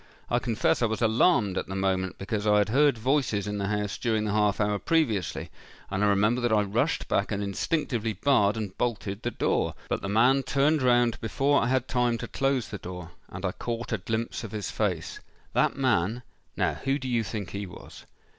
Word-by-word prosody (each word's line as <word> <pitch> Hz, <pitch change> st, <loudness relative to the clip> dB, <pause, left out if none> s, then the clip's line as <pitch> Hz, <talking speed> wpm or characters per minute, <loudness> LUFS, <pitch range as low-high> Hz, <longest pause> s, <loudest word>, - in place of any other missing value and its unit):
I 120 Hz, -, +3 dB
confess 115 Hz, -2 st, 0 dB
I 120 Hz, -, +3 dB
was 110 Hz, +2 st, -2 dB
alarmed 110 Hz, -, +3 dB
at -, -, -5 dB
the 95 Hz, -, -5 dB
moment, 95 Hz, -1 st, -1 dB
because 105 Hz, +2 st, -3 dB
I 105 Hz, 0 st, +5 dB
had 105 Hz, 0 st, +2 dB
heard 140 Hz, +2 st, +4 dB
voices 120 Hz, -4 st, 0 dB
in 105 Hz, 0 st, -3 dB
the 100 Hz, -, -1 dB
house 105 Hz, -1 st, -2 dB
during 110 Hz, -2 st, 0 dB
the 105 Hz, -, -1 dB
half 105 Hz, -1 st, +2 dB
hour 105 Hz, -1 st, +1 dB
previously; 120 Hz, -, 0 dB, 0.4 s
and 95 Hz, +2 st, 0 dB
I -, -, +4 dB
remember 105 Hz, +5 st, +2 dB
that 120 Hz, -1 st, +1 dB
I 105 Hz, -1 st, +4 dB
rushed 115 Hz, +10 st, 0 dB
back 100 Hz, -, 0 dB
and 100 Hz, 0 st, -1 dB
instinctively 115 Hz, -, -1 dB
barred 105 Hz, -1 st, +2 dB
and 100 Hz, -4 st, -4 dB
bolted 105 Hz, -4 st, -2 dB
the 120 Hz, -, -1 dB
door. -, -, 0 dB
But -, -, -1 dB
the 100 Hz, -, -4 dB
man 125 Hz, +6 st, +4 dB
turned 140 Hz, +3 st, +2 dB
round 120 Hz, -2 st, +3 dB
before 140 Hz, +6 st, +2 dB
I 115 Hz, -, +1 dB
had 130 Hz, 0 st, +1 dB
time 125 Hz, -2 st, +1 dB
to -, -, -6 dB
close 135 Hz, -3 st, 0 dB
the 100 Hz, -, -6 dB
door—and 90 Hz, +1 st, -9 dB
I 95 Hz, -, 0 dB
caught 115 Hz, +3 st, -4 dB
a 110 Hz, -, 0 dB
glimpse 110 Hz, +5 st, -3 dB
of 110 Hz, -, -7 dB
his 105 Hz, -2 st, -3 dB
face. 90 Hz, -7 st, -2 dB, 0.3 s
That -, -, +2 dB
man—now 120 Hz, -2 st, -1 dB
who 135 Hz, +1 st, +1 dB
do 130 Hz, -, -6 dB
you 120 Hz, -2 st, +1 dB
think 105 Hz, -4 st, -5 dB
he 100 Hz, 0 st, -4 dB
was?" 90 Hz, -, -12 dB
110 Hz, 205 wpm, -27 LUFS, 100-125 Hz, 0.4 s, I